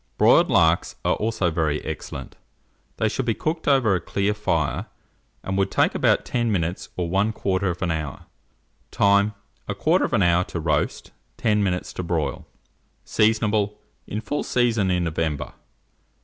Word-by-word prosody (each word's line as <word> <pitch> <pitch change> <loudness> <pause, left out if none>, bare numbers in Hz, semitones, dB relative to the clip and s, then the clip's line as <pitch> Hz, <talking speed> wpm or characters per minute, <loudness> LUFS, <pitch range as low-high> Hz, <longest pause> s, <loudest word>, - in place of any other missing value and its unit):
Broiled - - +5
larks 80 +1 +3
are - - +3
also 110 -5 0
very 80 -2 0
excellent: 80 - -6 0.6
they 110 - +1
should 130 - -1
be 115 - +1
cooked 160 +1 -3
over 130 -8 +4
a 90 - 0
clear 100 +1 0
fire, 85 -8 -1 0.6
and 95 0 -2
would 95 0 +2
take - - +2
about - - +2
10 120 -2 0
minutes 85 -2 -2
or 90 -2 -1
1/4 95 -2 0
hour. 80 -4 -4 0.6
Time. 100 +1 +3 0.3
1/4 100 - +2
hour 85 +1 +3
to 85 - -5
roast; 75 -2 -1 0.3
10 105 -2 +2
minutes 90 -3 -1
to - - -4
broil. 85 -3 -2 0.6
Seasonable. 105 -1 +1 0.3
In 105 - -4
full 145 +7 -2
season 115 -6 +1
in 90 -1 +1
November. 80 -3 -2
95 Hz, 140 wpm, -23 LUFS, 85-110 Hz, 0.6 s, Broiled